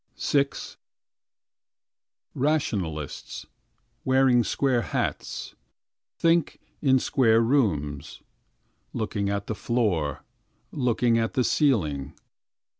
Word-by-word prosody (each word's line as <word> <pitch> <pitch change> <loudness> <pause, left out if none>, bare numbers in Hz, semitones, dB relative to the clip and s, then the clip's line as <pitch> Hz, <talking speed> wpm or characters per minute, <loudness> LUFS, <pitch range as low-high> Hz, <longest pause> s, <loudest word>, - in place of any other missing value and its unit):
VI 140 -1 +2 1.9
Rationalists, 100 - -2 0.6
wearing 130 -2 +4
square 130 0 +1
hats. - - -3 0.6
Think, 165 -2 +2 0.2
in 130 -3 +4
square 115 -3 +3
rooms. 95 - 0 0.7
Looking 105 -2 -2
at 100 0 -2
the 110 - -3
floor. 100 - -1 0.5
Looking 120 -2 +1
at 115 0 -2
the 125 - +3
ceiling. 80 - +1
115 Hz, 80 wpm, -26 LUFS, 100-130 Hz, 1.9 s, wearing